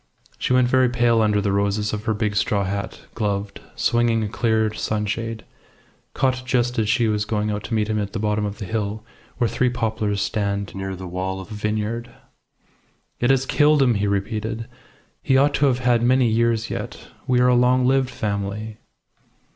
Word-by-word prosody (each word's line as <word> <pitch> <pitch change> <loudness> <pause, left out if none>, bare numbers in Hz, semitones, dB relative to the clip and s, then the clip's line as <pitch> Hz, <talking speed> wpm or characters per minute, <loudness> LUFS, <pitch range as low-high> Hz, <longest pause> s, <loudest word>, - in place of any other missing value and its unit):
She - - -1
went 125 -1 +4
very 130 0 +3
pale 120 -2 +3
under 105 -1 +2
the 100 0 0
roses 100 +1 0
of 105 0 -4
her 110 - +1
big 105 0 -1
straw 105 -1 +1
hat, 100 +1 -4
gloved, 100 -2 -3
swinging 120 -1 +2
a - - -1
clear 110 -1 +1
sunshade, 110 +1 -3 0.7
caught 130 -1 +1
just 125 -1 0
as 105 -2 0
she 115 +1 +2
was 105 -1 0
going 105 0 -1
out 105 0 -3
to 115 - -2
meet 105 -1 +1
him 110 -1 -1
at 100 -1 -4
the - - -2
bottom 105 0 0
of 105 0 -3
the 100 - -6
hill, 105 +1 -3 0.3
where 120 - +2
three 125 +2 +1
poplars 110 -4 -1
stand 100 -1 -2
near 95 0 -4
the 95 0 -8
wall 95 +2 -3
of 95 - -10
a - - -5
vineyard. 105 +3 -2 1.1
"It 120 - +1
has 135 -1 +3
killed 150 0 +4
him!" 125 -3 +3
he 100 -1 0
repeated. 110 +3 -2 0.6
"He 135 -3 +3
ought 140 +2 +4
to 145 - +3
have 125 -2 +2
had 125 -2 +2
many 130 +1 +3
years 115 0 +1
yet. - - -6 0.2
We 125 -1 +3
are 125 - +4
a - - +4
long 125 +1 +3
lived 130 0 +2
family." 105 0 -4
110 Hz, 195 wpm, -22 LUFS, 105-120 Hz, 1.1 s, went